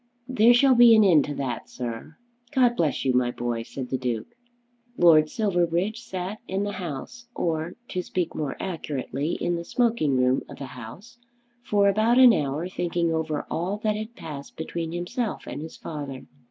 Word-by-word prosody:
"There 240 -2 +5
shall 265 +2 +5
be 240 -2 +8
an 215 - +6
end 170 -7 +5
to 145 - -5
that, 130 -4 -4
sir." 120 +5 -6 0.4
"God 245 -2 +4
bless 150 - 0
you, 130 - +2
my 125 -1 +2
boy!" 120 -1 -3
said 125 +2 -7
the 130 - 0
Duke. 120 -4 -3 0.6
Lord 155 -3 +6
Silverbridge 190 +1 0
sat 190 -1 -5
in 195 +2 -1
the 205 - -2
House 190 - -7
or, 165 0 -2
to 185 - -2
speak 180 -1 -3
more 145 -3 -3
accurately, 150 -4 -3
in 175 0 -1
the 170 - -5
smoking 220 - +1
room 125 +1 +2
of - - -10
the 140 - -6
House 125 - -11 0.4
for 205 -4 +2
about 215 +4 +3
an 255 -2 +9
hour 150 0 -1
thinking 175 -2 -1
over 160 -2 -2
all 185 +5 -1
that 215 -1 +1
had 215 +2 -6
passed 140 -2 -9
between 165 0 -4
himself 175 +7 -3
and - - -6
his 160 - -8
father. 145 -4 -7
170 Hz, 180 wpm, -25 LUFS, 140-210 Hz, 0.6 s, an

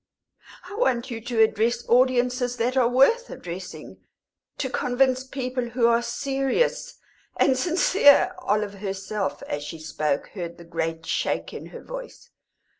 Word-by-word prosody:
"I 385 - -9
want 260 - 0
you 225 -1 -5
to 230 -1 +2
address 230 +2 0
audiences 250 0 +2
that 245 +2 0
are 255 -3 +4
worth 365 - +4
addressing 180 +1 -8 0.6
to 270 - -1
convince 255 0 +1
people 255 -1 -3
who 240 0 0
are 235 0 +4
serious 270 - -1 0.4
and 265 - +4
sincere." 340 +2 +4
Olive 210 - -1
herself, 195 -5 -3
as 145 - -4
she 155 +2 -7
spoke, 155 -2 -2
heard 170 -3 -7
the 170 - -12
great 165 -1 -3
shake - - -2
in - - -7
her - - -11
voice. - - -9
245 Hz, 140 wpm, -25 LUFS, 200-265 Hz, 0.6 s, are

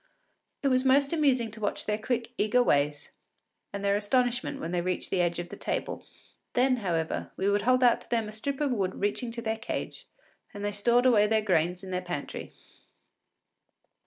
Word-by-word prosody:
It 275 - +3
was 255 0 +3
most 275 +3 +4
amusing 260 -8 +2
to 215 - -10
watch 205 - -2
their 210 0 -1
quick, 235 +1 -2
eager 240 +4 +3
ways, 145 -4 +1 0.6
and 200 0 -4
their 200 0 +3
astonishment 245 +6 0
when 170 - -4
they 175 -1 0
reached 185 +1 -2
the 185 - +2
edge 175 -1 0
of 175 0 -5
the - - -7
table. - - -3 0.5
Then, 255 +1 +3
however, 170 -7 -2
we 190 - 0
would 205 0 +2
hold 255 +3 +3
out 240 -1 +4
to - - -16
them 230 -2 0
a - - -7
strip 265 +6 -4
of 285 -2 +1
wood 195 -6 -1
reaching 205 +4 -1
to 235 -1 -5
their 220 0 -2
cage, - - -5 0.5
and 205 0 -4
they 205 - 0
stored 235 +5 +2
away 215 -5 +5
their 220 0 +2
gains 180 -1 +1
in 190 - -7
their 180 0 -1
pantry. 175 -5 -6
215 Hz, 195 wpm, -28 LUFS, 190-250 Hz, 0.6 s, away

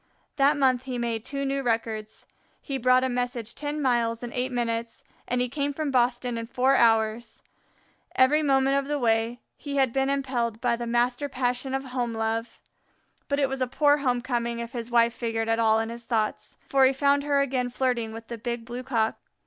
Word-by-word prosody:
That 285 +2 +4
month 260 -2 +2
he 255 -2 -4
made 230 -2 -2
two 275 +2 -3
new 275 0 -1
records. 225 -3 -2 0.3
He 275 -1 -4
brought 255 +1 +4
a - - +2
message 245 -2 -3
ten 295 +1 -4
miles 235 -4 +1
in 240 - -6
eight 255 +1 -1
minutes, 230 -1 -3 0.2
and 250 0 0
he 250 - +1
came 285 +2 -2
from 300 0 -2
Boston 245 -1 +1
in 230 - -6
four 260 +3 +2
hours. 225 -1 +2 0.7
Every 275 +4 +4
moment 270 -1 +3
of 280 - 0
the 295 0 -1
way 230 -1 +1 0.2
he 285 -1 -6
had 265 -4 +2
been 270 0 +1
impelled 255 -5 -1
by 240 0 +1
the 235 0 -5
master 245 +4 0
passion 255 0 -1
of 270 - -2
home 250 -2 -2
love. 225 +1 -2 0.7
But 280 - 0
it 280 -1 +2
was 265 0 -4
a 255 - +1
poor 290 +3 +3
home 250 -4 0
coming 235 -2 -2
if 235 0 -5
his 235 -1 -5
wife 235 -1 +3
figured 225 -2 -2
at 225 0 +1
all 220 -1 +4
in 225 0 -1
his 235 0 -8
thoughts, 220 -3 -2
for 270 -1 +3
he 260 - +4
found 280 +1 +3
her 285 -1 +1
again 255 -3 0
flirting 245 -3 -1
with 225 +1 -9
the 235 0 -7
Big 235 0 -4
Blue 240 +1 -6
cock. 230 -4 -1
245 Hz, 205 wpm, -26 LUFS, 230-270 Hz, 0.7 s, That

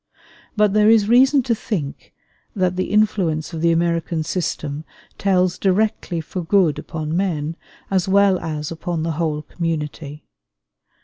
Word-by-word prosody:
But 210 -2 +3
there 210 0 +5
is 220 -2 +5
reason 260 +4 +5
to 240 -1 +1
think 175 -10 -5 0.4
that 185 -2 +1
the 185 - -1
influence 185 -7 +1
of 160 - -4
the 170 0 +3
American 165 -1 0
system 155 -4 -3 0.4
tells 185 -2 +1
directly 195 -3 0
for 175 +3 -5
good 170 -4 +2
upon 160 -2 -4
men 165 -4 -1 0.4
as 190 -2 +1
well 195 -1 +4
as 155 -2 -4
upon 165 0 -3
the 165 - -1
whole 155 -1 -2
community. 150 -3 -5
175 Hz, 140 wpm, -21 LUFS, 160-200 Hz, 0.4 s, there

